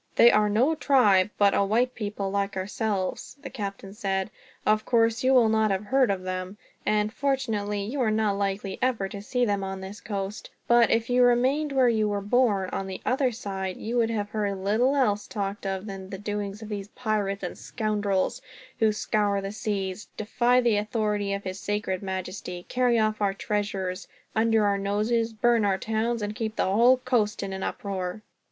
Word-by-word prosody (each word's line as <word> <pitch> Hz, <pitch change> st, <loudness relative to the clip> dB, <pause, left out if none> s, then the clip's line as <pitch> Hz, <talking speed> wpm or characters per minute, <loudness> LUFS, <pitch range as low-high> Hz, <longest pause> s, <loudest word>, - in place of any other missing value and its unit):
"They 235 Hz, -, +8 dB
are 210 Hz, 0 st, +3 dB
no 245 Hz, +9 st, +3 dB
tribe, 230 Hz, -11 st, +4 dB
but 200 Hz, -1 st, +4 dB
a -, -, +3 dB
white 235 Hz, +5 st, +1 dB
people, 205 Hz, -3 st, -4 dB
like 200 Hz, -1 st, -1 dB
ourselves," 200 Hz, +4 st, -3 dB
the -, -, -7 dB
captain 195 Hz, -4 st, -6 dB
said. 195 Hz, 0 st, -2 dB, 0.3 s
"Of 215 Hz, 0 st, +3 dB
course, 230 Hz, 0 st, +2 dB
you 260 Hz, -, +4 dB
will 250 Hz, -4 st, +6 dB
not 220 Hz, 0 st, +2 dB
have 195 Hz, +1 st, -1 dB
heard 260 Hz, +1 st, +3 dB
of 190 Hz, -2 st, -1 dB
them. 185 Hz, +1 st, -4 dB, 0.3 s
And, 210 Hz, 0 st, +1 dB
fortunately, 225 Hz, -7 st, -1 dB
you 255 Hz, +7 st, -3 dB
are 230 Hz, -, +2 dB
not 215 Hz, -2 st, +1 dB
likely 195 Hz, -1 st, -2 dB
ever 245 Hz, -6 st, +1 dB
to 200 Hz, -, -7 dB
see 245 Hz, +4 st, 0 dB
them 200 Hz, -3 st, 0 dB
on 190 Hz, 0 st, -4 dB
this 190 Hz, +3 st, -8 dB
coast; 200 Hz, 0 st, -5 dB, 0.2 s
but 235 Hz, 0 st, +5 dB
if 230 Hz, 0 st, +1 dB
you 250 Hz, 0 st, +4 dB
had 245 Hz, -, +7 dB
remained 265 Hz, +5 st, +2 dB
where 265 Hz, -2 st, +4 dB
you 220 Hz, -3 st, +2 dB
were 205 Hz, -1 st, -1 dB
born, 205 Hz, -3 st, +1 dB
on 195 Hz, -, -3 dB
the 190 Hz, -1 st, -5 dB
other 260 Hz, 0 st, +2 dB
side, 190 Hz, -4 st, -4 dB
you 230 Hz, +3 st, -4 dB
would 230 Hz, -1 st, +3 dB
have 210 Hz, -2 st, -2 dB
heard 205 Hz, -2 st, -1 dB
little 220 Hz, +8 st, +2 dB
else 210 Hz, -7 st, +1 dB
talked 200 Hz, -1 st, -4 dB
of 190 Hz, +1 st, -3 dB
than 195 Hz, -2 st, -7 dB
the 195 Hz, -, -5 dB
doings 205 Hz, +1 st, -4 dB
of 215 Hz, -, -9 dB
these 200 Hz, -2 st, -4 dB
pirates 210 Hz, -4 st, -2 dB
and 180 Hz, -, -4 dB
scoundrels; 205 Hz, -4 st, -1 dB, 0.4 s
who 220 Hz, -1 st, +4 dB
scour 210 Hz, -1 st, 0 dB
the 195 Hz, 0 st, -4 dB
seas, 205 Hz, -3 st, -3 dB
defy 240 Hz, +3 st, +2 dB
the 235 Hz, -4 st, +3 dB
authority 210 Hz, -1 st, -1 dB
of 200 Hz, 0 st, -3 dB
his 185 Hz, 0 st, -5 dB
sacred 205 Hz, -3 st, -2 dB
majesty, 185 Hz, -2 st, -5 dB
carry 245 Hz, -2 st, +2 dB
off 215 Hz, -1 st, +1 dB
our 195 Hz, -1 st, +1 dB
treasures 195 Hz, -3 st, -3 dB, 0.3 s
under 220 Hz, -1 st, +3 dB
our 200 Hz, -1 st, +1 dB
noses, 215 Hz, +4 st, 0 dB
burn 230 Hz, +1 st, +2 dB
our 195 Hz, -2 st, +2 dB
towns, 225 Hz, +2 st, -1 dB
and 205 Hz, +1 st, -3 dB
keep 220 Hz, -2 st, -3 dB
the -, -, +1 dB
whole 235 Hz, +7 st, +5 dB
coast 240 Hz, -6 st, 0 dB
in 195 Hz, -1 st, -4 dB
an 190 Hz, -, -5 dB
uproar." 190 Hz, +1 st, -4 dB
210 Hz, 195 wpm, -26 LUFS, 195-230 Hz, 0.4 s, They